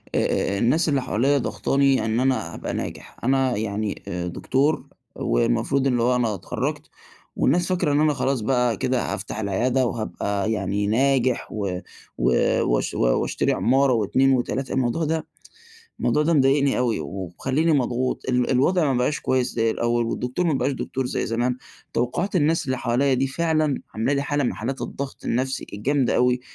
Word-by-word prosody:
آآ، 100 - +1
الناس 150 +9 +2
اللي 140 -2 +1
حواليَّ 135 +6 +1
ضاغطاني 135 -1 +1
إن 110 +1 0
أنا 125 -10 0
أبقى - - -5
ناجح، - - -6
أنا 130 -1 +2
يعني، 105 -1 -3
آآ، 90 -2 -3
دكتور 135 - 0 0.3
والمفروض 135 - +1
اللي 120 -3 +1
هو 125 +1 +3
أنا 120 -3 +1
اتخرجت، 95 - -4 0.5
والناس 170 +6 +2
فاكرة 180 -5 +1
إن 145 - +3
أنا 155 0 +3
خلاص 135 -2 -1
بقى 125 -1 +1
كده 125 -3 -1
هافتح 100 +2 -5
العيادة، 120 +6 +1
وهابقى 110 -2 -2
يعني 100 -1 -1
ناجح 130 +2 +2
و 100 -4 -3 0.4
و - - +2 0.3
وأش - - 0
وأشتري - - +1
عمارة 135 +1 +3
و2 130 +5 +2
و3 130 +1 -1
الموضوع 130 +5 0
ده 160 0 -2 0.7
الموضوع 150 - +2
ده 165 +3 +2
مضايقني 140 -1 +3
أوي، 120 -7 0
ومخليني 100 - -1
مضغوط 125 -2 0
ال 125 -1 +1
الوضع 155 +7 +3
ما 125 - 0
بقاش 125 +4 0
كويس 130 -1 0
زي 115 -1 +2
الأول، 120 +1 0
والدكتور 125 +9 -2
ما 160 - +2
بقاش 130 +1 0
دكتور 130 0 -3
زي - - -2
زمان، 120 +2 0 0.4
توقّعات 125 - -1
الناس 160 -2 +2
اللي 130 -1 -1
حواليّ 130 +4 +1
دي 130 +2 +1
فعلًا 155 0 0
عاملة 110 +6 0
لي 140 -1 +1
حالة 145 0 0
من - - 0
حالات 130 +5 -4
الضغط 140 0 -6
النفسي 130 +3 -1
الجامدة 130 +5 +1
أوي، 125 0 +2
130 Hz, 165 wpm, -23 LUFS, 115-140 Hz, 0.7 s, هو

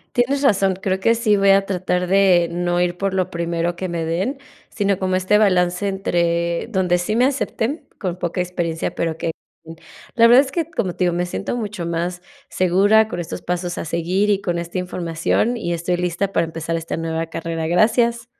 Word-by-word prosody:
Tienes 265 +3 +1
razón, 195 -7 +3
creo 190 0 -2
que 230 +4 +3
sí 225 -3 +2
voy 195 0 +4
a 195 0 +5
tratar 180 -1 -1
de 185 -3 +4
no 175 0 -1
ir 175 0 0
por 195 -1 -1
lo 185 -1 0
primero 170 0 -2
que 185 +1 -4
me 170 -1 -3
den, 185 - -2 0.3
sino 200 -3 0
como 185 -1 -1
este 185 +3 +3
balance 180 -2 +2
entre 170 -3 0
donde 180 -4 +1
sí 180 +5 -2
me 245 +3 +4
acepten, 275 +1 -2
con 180 -4 -3
poca 175 0 -2
experiencia, 175 -2 -2
pero 165 -1 -2
que, 165 - -2 0.3
mm, 165 0 -9 0.4
la 230 -1 +7
verdad 245 +4 +7
es 270 - -8
que, 330 -1 -1
como 200 - -2
te 185 - +1
digo, 175 - +2
me 175 +1 -1
siento 195 +6 -4
mucho 210 -7 -4
más 175 +1 -3 0.3
segura 200 +5 +3
con 175 - -5
estos 170 - -6
pasos 175 0 -3
a - - -4
seguir 175 +5 0
y 200 -1 +2
con 175 -3 -2
esta 170 +2 -4
información, 180 +6 -1
y 175 -7 -3
estoy 170 +2 -1
lista 180 +2 -2
para 165 - +2
empezar 165 0 -4
esta 165 0 -4
nueva 165 0 -2
carrera. 165 0 -4
Gracias. 230 +6 +2
180 Hz, 200 wpm, -20 LUFS, 170-205 Hz, 0.4 s, la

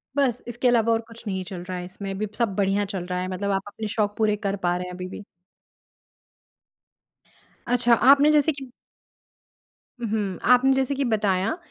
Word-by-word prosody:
बस 255 -4 +1
इसके 240 +1 -1
अलावा 230 -1 +3
और 225 - +2
कुछ 230 0 -13
नहीं 190 -1 -2
चल 180 -1 -7
रहा 185 0 -5
है 180 - -5
इसमें। 195 +2 -7
अभी 210 +2 -3
सब 225 -6 0
बढ़िया 200 0 +1
चल 190 -3 -5
रहा 180 0 -3
है, 185 - -3
मतलब 195 +2 -2
आप 195 0 +1
अपने 215 +1 -6
शौक 210 -1 -1
पूरे 215 -1 +2
कर 200 -1 -2
पा 175 0 +2
रहे 180 - -4
हैं 180 - -7
अभी 180 0 -6
भी। 205 - -9 2.4
अच्छा 240 -1 +3 0.2
आपने 285 +2 +7
जैसे 300 +1 +4
कि 270 -3 -9 1.3
उम, - - 0
हुँ। 205 -4 -2
आपने 265 +2 +4
जैसे 270 +1 0
कि 275 - 0
बताया 210 - 0
210 Hz, 190 wpm, -24 LUFS, 190-245 Hz, 2.4 s, आपने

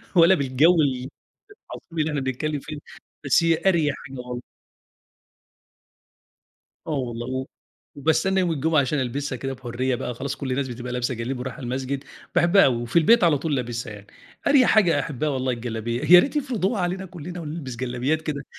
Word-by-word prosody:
ولا 175 +2 +7
بالجو 140 +5 +3
ال 130 -2 -1 0.4
العظيم 170 - -10
اللي 155 +1 +1
إحنا 145 -2 -2
بنتكلّم 140 +3 -2
فيه، 150 +2 -8 0.5
بس 140 +5 +4
هي 165 -1 +2
أريح 160 -6 +3
حاجة 135 -1 -9
وال 125 0 -6 2.5
آه - - -3
والله. 120 -4 -3
و 130 0 -3 0.5
وباستنّى 160 +6 +1
يوم 175 -2 +1
الجمعة 155 +1 +2
عشان 140 +2 -1
ألبسها 130 +2 -2
كده 135 +2 -4
بحُريّة 125 0 -2
بقى، 125 -1 -4
خلاص 135 +3 -4
كل 130 -2 -4
الناس 130 +1 -1
بتبقى 125 0 -6
لابسة 125 +1 -1
جلاليب 125 +3 -4
ورايحة 135 +3 -6
المسجد، 130 +2 -3 0.3
باحبها 175 +2 +5
أوي. 130 -3 +3
وفي 120 +8 +1
البيت 230 +6 +5
على 160 -4 +4
طول 150 0 -1
لابسها 120 -3 -4
يعني، 100 0 -12 0.4
أريح 275 -3 +5
حاجة 195 -7 +4
أحبّها 150 0 -2
والله 130 -2 -1
الجلابية، 115 0 -3
يا - - +11
ريت 280 +9 0
يفرضوها 235 -8 0
علينا 185 +2 -2
كُلّنا 175 0 -8
ونلبس 150 -5 -6
جلابيات 130 +5 -1
كده 150 -3 -4
140 Hz, 170 wpm, -24 LUFS, 125-165 Hz, 2.5 s, يا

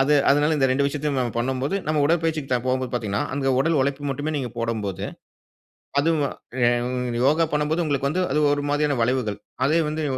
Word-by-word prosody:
அது 140 +2 +4 0.2
அதுனால 145 +3 +3
இந்த 135 -2 +3
2 140 +2 +2
விஷயத்தையும் 145 -1 -1
நம்ம 120 -3 -1
பண்ணும்போது, 130 +7 -1
நம்ம 155 -1 +1
உடற்பயிற்சிக்கு 155 -5 0
போம்போது 130 -1 0
பாத்தீங்கன்னா, 105 -4 -1
அங்க 135 -1 +1
உடல் 160 +2 +2
உழைப்பு 140 +1 -1
மட்டுமே 145 +4 -3
நீங்க 125 -4 -3
போடும்போது, 110 -5 -2 1.0
அது 150 - +1
உங்க 125 -3 -1
யோகா 160 +3 +3
பண்ணும்போது 150 +3 +1
உங்களுக்கு 140 -2 0
வந்து 180 +4 0
அது 150 +2 +2
ஒரு 145 0 -2
மாரியான 145 -2 +1
வளைவுகள். 115 -3 0 0.3
அதே 155 +4 +3
வந்து 155 +1 -3
140 Hz, 170 wpm, -23 LUFS, 125-150 Hz, 1.0 s, அது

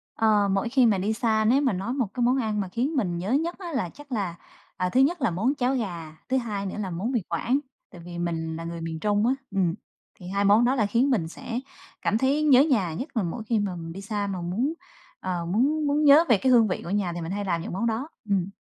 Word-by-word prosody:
Ờ, 210 -2 +3
mỗi 195 +4 0
khi 260 0 +4
mà 215 -4 +3
đi 205 +4 0
xa 220 -1 +1
nếu 255 +6 +4
mà 265 -7 +2
nói 195 +7 -3
một 260 -6 0
cái 245 - -1
món 250 +2 +3
ăn 215 -4 0
mà 195 - -3
khiến 255 - -1
mình 185 -10 0
nhớ 185 +6 -3
nhất 325 +6 +1
á 350 -3 -6
là 185 -10 -1
chắc 290 - -15
là, 195 -8 -2 0.4
à, 180 - 0
thứ 250 - +2
nhất 315 +4 +2
là 235 - +2
món 225 - 0
cháo 255 -1 +1
gà, 170 -9 -4
thứ 265 - +2
hai 210 -5 -3
nữa 190 - -4
là 195 - -3
món 185 +9 -3
Mì 240 - +1
Quảng, 235 - +1 0.3
tại 175 - -12
vì 175 -1 -7
mình 165 -2 -2
là 165 - -6
người 170 0 -6
miền 165 -1 -4
Trung 210 +4 +1
á. 255 - +3 0.2
Ừ, 195 - -1 0.6
thì 180 - -10
hai 200 +2 0
món 210 +4 +5
đó 255 +2 +2
là 225 -5 +2
khiến 235 +7 +2
mình 190 -11 +1
sẽ 235 +8 -5 0.4
cảm 215 - +1
thấy 275 +5 +1
nhớ 275 -3 +7
nhà, 210 - +1
nhất 260 - -6
là 220 - +2
mỗi 185 +6 -4
khi 220 -1 0
mà 200 -3 -2
mình 165 -1 -7
đi 195 - -7
xa 205 0 -2
mà 190 -2 -4
muốn, 215 - -1 0.5
ờ, 180 -2 -3
muốn 275 - +1
muốn 290 +2 +2
nhớ 295 +2 +8
về 230 - +6
cái 260 +6 +2
hương 235 -3 +6
vị 180 - -2
của - - -7
nhà, 190 -3 0
thì 175 - -5
mình 165 +2 -5
hay 205 0 -3
làm 170 -3 0
những - - -6
món 195 +6 -1
đó. 230 +5 -1 0.2
Ừm. 195 -2 +1
215 Hz, 275 wpm, -26 LUFS, 180-255 Hz, 0.6 s, nhớ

